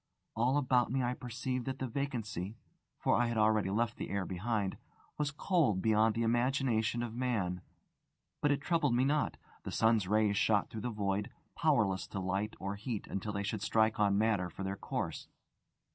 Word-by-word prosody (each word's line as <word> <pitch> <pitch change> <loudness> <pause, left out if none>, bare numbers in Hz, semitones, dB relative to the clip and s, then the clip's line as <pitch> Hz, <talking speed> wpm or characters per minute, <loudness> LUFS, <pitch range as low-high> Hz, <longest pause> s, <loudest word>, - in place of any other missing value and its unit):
All 125 +5 +2
about 125 -4 +2
me 130 0 +1
I 125 0 0
perceived 125 0 -4
that 135 0 -2
the 130 - -3
vacancy 115 - -3 0.4
(for - - +2
I 120 - +2
had 115 -1 -2
already 110 -2 +3
left 115 +3 0
the - - -5
air 100 -1 -1
behind) 100 +2 -2 0.4
was 150 -1 +1
cold 145 - +1
beyond 110 +1 +3
the 115 - 0
imagination 120 -1 +1
of 120 -2 -4
man; 110 -8 -1 0.8
but 145 - +3
it 145 0 +1
troubled 150 -6 +2
me 125 +2 +3
not. 150 +2 +1 0.2
The - - -6
sun's 110 -4 +3
rays 105 0 +2
shot 105 -1 +2
through 110 - -5
the 125 - -2
void, 100 -2 -1 0.3
powerless 95 -3 +2
to 100 - -5
light 95 +3 -2
or 100 +1 -3
heat 110 0 -4
until 100 +2 -4
they 100 0 -2
should 105 0 -3
strike 110 0 +2
on 100 -1 +3
matter 105 -5 +1
in 95 - -3
their 95 +1 -2
course. - - -4
110 Hz, 185 wpm, -33 LUFS, 100-125 Hz, 0.8 s, already